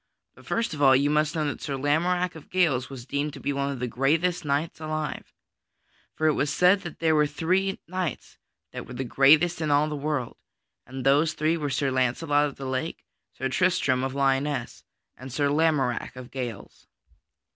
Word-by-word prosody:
But - - -18
first 230 -5 -1
of 150 - -6
all 135 -2 +7
you 140 +2 +2
must 150 +1 +1
know 155 -1 0
that 145 - -4
Sir 140 - -3
Lamorack 175 +6 +1
of 160 -3 -13
Gales 155 -9 +1
was 130 -3 -9
deemed 140 +2 -2
to 140 - -9
be 140 - -2
one 140 0 -1
of 135 - -5
the 125 - -1
greatest 155 +9 +1
knights 145 +3 -1
alive. 155 -1 -4 0.8
For 155 - -1
it 155 - +4
was 145 - 0
said 180 +5 +4
that 170 - -8
there 160 -1 +2
were 150 -1 +3
three 185 +6 0
knights 185 -4 -4 0.3
that - - -7
were 125 - -9
the 130 - -3
greatest 155 +7 +4
in 155 - -1
all 145 0 +4
of 155 - -2
the - - -2
world, 145 -4 -3 0.5
and 130 0 -7
those 150 +4 +4
three 155 +2 +1
were 150 -3 -2
Sir 135 0 0
Launcelot 145 +4 +1
of 140 - -8
the 135 - -8
Lake, 130 +5 -4 0.3
Sir 130 - -1
Tristram 140 -4 +1
of 135 0 -3
Lyonesse, 135 -1 0 0.3
and 130 +1 -9
Sir 145 +3 +1
Lamorack 150 -7 +1
of 125 -1 -10
Gales. 120 -6 -7
145 Hz, 200 wpm, -26 LUFS, 135-160 Hz, 0.8 s, all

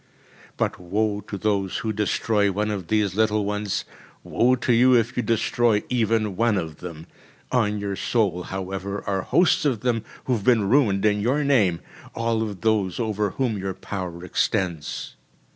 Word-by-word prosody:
But - - -1
woe 105 +3 -1
to 100 - -5
those 100 -1 0
who 110 - 0
destroy 105 0 +1
one 105 +2 -1
of 95 -5 -4
these 105 -1 +1
little 105 0 +1
ones, 105 -1 -2 0.4
woe 125 +2 +2
to 125 0 +1
you 125 +2 +5
if 120 +1 +1
you - - +1
destroy 115 -1 +1
even 110 -4 +1
one 115 0 +2
of 80 -4 -4
them. 85 -3 -8 0.5
On 105 -5 +1
your 100 -1 -3
soul, 100 -5 0
however, 95 +2 -5
are 95 -1 0
hosts 170 - +3
of 130 -8 0
them, 120 -3 0 0.2
who 130 - +1
have 110 -5 -1
been 115 -4 +3
ruined 110 -5 +3
in 105 -1 +2
your 135 +7 +1
name, 105 -12 +2 0.3
all 115 -1 0
of 105 -5 -4
those 105 -4 +1
over 105 -3 0
whom 120 -5 -1
your 95 -1 -3
power 90 -4 -6
extends. 90 -5 -2
105 Hz, 170 wpm, -24 LUFS, 95-115 Hz, 0.5 s, you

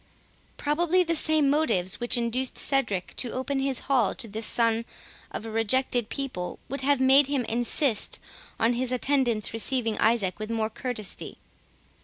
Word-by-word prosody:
Probably 345 +5 +2
the 335 -1 -1
same 310 -2 +4
motives 190 - +1
which 240 +1 +3
induced 240 +2 -1
Cedric 225 -10 -1
to 245 - -3
open 270 +2 -2
his 270 -1 -1
hall 255 -7 +1
to 250 - -2
this 215 +1 -4
son 230 -1 +2 0.5
of - - -6
a 225 - -6
rejected 230 +1 +1
people, 255 -11 -4
would 275 0 -4
have 280 0 +2
made 265 +1 +5
him 275 -4 -1
insist 240 0 +1 0.4
on 230 +2 +3
his 250 +1 -1
attendants 250 -5 0
receiving 225 -1 -1
Isaac 220 -5 +1
with 215 0 -5
more 225 -1 -1
courtesy. 220 -4 -5
245 Hz, 155 wpm, -26 LUFS, 225-275 Hz, 0.5 s, made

